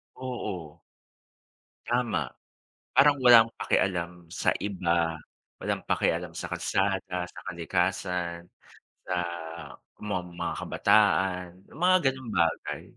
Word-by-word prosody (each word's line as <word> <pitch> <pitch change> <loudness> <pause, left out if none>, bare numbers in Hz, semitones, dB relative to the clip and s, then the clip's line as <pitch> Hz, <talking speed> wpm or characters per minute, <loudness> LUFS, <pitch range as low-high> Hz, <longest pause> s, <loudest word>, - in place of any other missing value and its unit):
Oo. 95 -11 -6 1.1
Tama, 120 0 +1 0.8
parang 145 +1 +6
walang 115 -2 +9
pakialam 85 -2 -1
sa - - +1
iba, 85 -4 0 0.4
walang - - -2
pakialam - - 0
sa - - -4
kalsada, 95 -2 -1
sa - - -9
kalikasan, 90 0 -1 0.6
sa 90 - -2 0.9
ma 105 - -1
mga 85 0 -4
kabataan, 90 -3 +3 0.3
mga 185 +1 +6
gano'ng 130 -3 -7
bagay. 85 - -1
90 Hz, 95 wpm, -28 LUFS, 85-110 Hz, 1.1 s, walang